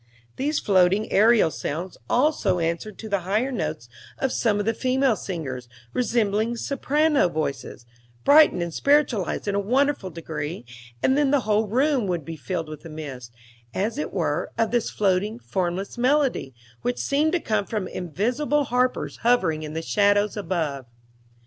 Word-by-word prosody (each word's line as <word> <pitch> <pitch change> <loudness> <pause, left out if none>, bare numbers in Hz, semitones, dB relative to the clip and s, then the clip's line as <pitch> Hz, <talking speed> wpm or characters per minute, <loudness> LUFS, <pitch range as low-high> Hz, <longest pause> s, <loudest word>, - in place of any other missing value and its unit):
These 295 +3 -1
floating 190 +1 +2
aerial 215 -4 +5
sounds 170 +6 -4
also 245 - +2
answered 170 +5 -2
to 220 - -8
the 200 -2 0
higher 210 +9 0
notes 155 - -3 0.3
of 265 - -1
some 215 -4 +1
of 205 - -1
the 225 - +1
female 255 +1 +1
singers, 135 -12 -5 0.2
resembling 230 -1 0
soprano 285 - +1
voices, 145 -6 -4 0.4
brightened 295 - +6
and 170 -1 -5
spiritualized 275 - +1
in 200 - 0
a 200 - +1
wonderful 255 0 +1
degree; 160 -3 -6 0.4
and 265 - +4
then 290 -1 +3
the 285 -1 +3
wide 215 0 +1
room 260 -2 +2
would 175 -5 -2
be 165 - -6
filled 165 0 -4
with 155 -1 -9
a 165 - -9
mist, 135 -6 -8 0.4
as 220 +8 -1
it - - -3
were, - - -1
of 225 - +1
this 240 -2 +1
floating, 205 +2 0
formless 190 0 -3
melody, 260 - +1 0.3
which 125 0 -1
seemed 285 - +1
to 360 - +2
come 215 -8 -1
from 210 -4 -2
invisible 245 - -1
harpers 250 -1 0
hovering 230 -10 +2
in 155 0 -6
the 160 - -3
shadows 205 +2 +2
above. 160 - -2
205 Hz, 160 wpm, -24 LUFS, 170-250 Hz, 0.4 s, brightened